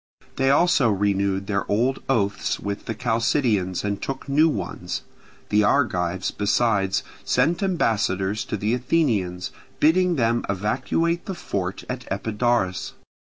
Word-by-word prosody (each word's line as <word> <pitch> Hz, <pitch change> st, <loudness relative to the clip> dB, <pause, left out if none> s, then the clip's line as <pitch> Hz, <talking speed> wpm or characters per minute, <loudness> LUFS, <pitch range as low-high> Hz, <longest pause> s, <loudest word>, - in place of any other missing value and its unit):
They 135 Hz, 0 st, +2 dB
also 145 Hz, -4 st, +4 dB
renewed 100 Hz, -1 st, 0 dB
their 100 Hz, 0 st, -2 dB
old 120 Hz, +6 st, +1 dB
oaths 105 Hz, -6 st, 0 dB
with 100 Hz, 0 st, -5 dB
the 115 Hz, -, -3 dB
Chalcidians 115 Hz, -5 st, 0 dB
and 100 Hz, -1 st, -2 dB
took 135 Hz, 0 st, -5 dB
new 150 Hz, +4 st, +4 dB
ones: 90 Hz, -, -4 dB, 0.5 s
the 105 Hz, +1 st, +3 dB
Argives, 95 Hz, -7 st, +1 dB
besides, 100 Hz, -2 st, +1 dB, 0.2 s
sent 155 Hz, +9 st, +1 dB
ambassadors 110 Hz, -, 0 dB
to 110 Hz, -, -3 dB
the 105 Hz, +3 st, 0 dB
Athenians, 115 Hz, -, 0 dB, 0.3 s
bidding 180 Hz, +3 st, +4 dB
them 120 Hz, -3 st, +1 dB
evacuate 130 Hz, -, 0 dB
the 190 Hz, -, -3 dB
fort 95 Hz, -, -4 dB
at 125 Hz, 0 st, -6 dB
Epidaurus. 105 Hz, -1 st, 0 dB
110 Hz, 125 wpm, -23 LUFS, 100-135 Hz, 0.5 s, also